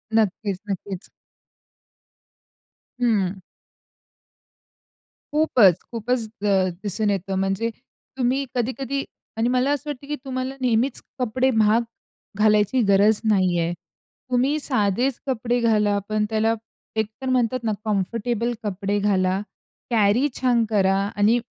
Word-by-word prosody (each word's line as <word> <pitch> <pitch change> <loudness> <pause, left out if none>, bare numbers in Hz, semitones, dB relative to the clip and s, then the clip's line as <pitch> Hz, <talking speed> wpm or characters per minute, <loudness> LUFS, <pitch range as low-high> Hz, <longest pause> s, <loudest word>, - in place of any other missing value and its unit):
नक्कीच, 205 -2 +1
नक्कीच. 195 -1 -5 1.9
हं. 200 -6 +1 1.9
खूपच, 240 - +5
खूपच 230 0 -1
द - - -3 0.4
दिसून 210 +1 -1
येतं 195 -1 -1
म्हणजे 195 +4 0 0.5
तुम्ही 260 +2 +1
कधी-कधी 265 +3 -1 0.3
आणि 230 +2 +1
मला 255 +2 +2
असं 290 +1 -2
वाटतं 280 -1 -6
की 295 - -2
तुम्हाला 260 0 -3
नेहमीच 245 +2 +1 0.2
कपडे 255 +2 +1
महाग 220 0 +4 0.6
घालायची 210 +3 +3
गरज 205 +2 +4
नाही 185 -4 +2
आहे. 170 +1 0 0.6
तुम्ही 265 +5 +2
साधेच 245 0 0
कपडे 245 -2 0
घाला. 210 -3 +2
पण 215 0 +1
त्याला 220 +1 +2 0.4
एकतर 220 +5 -3
म्हणतात 255 -1 +1
ना 220 - +1
कम्फर्टेबल 230 +3 -1
कपडे 205 0 -1
घाला. 190 -2 +1 0.5
कॅरी 230 +5 +3
छान 240 -3 +3
करा 195 -2 +3 0.2
आणि 215 +4 +4
220 Hz, 110 wpm, -23 LUFS, 205-250 Hz, 1.9 s, खूपच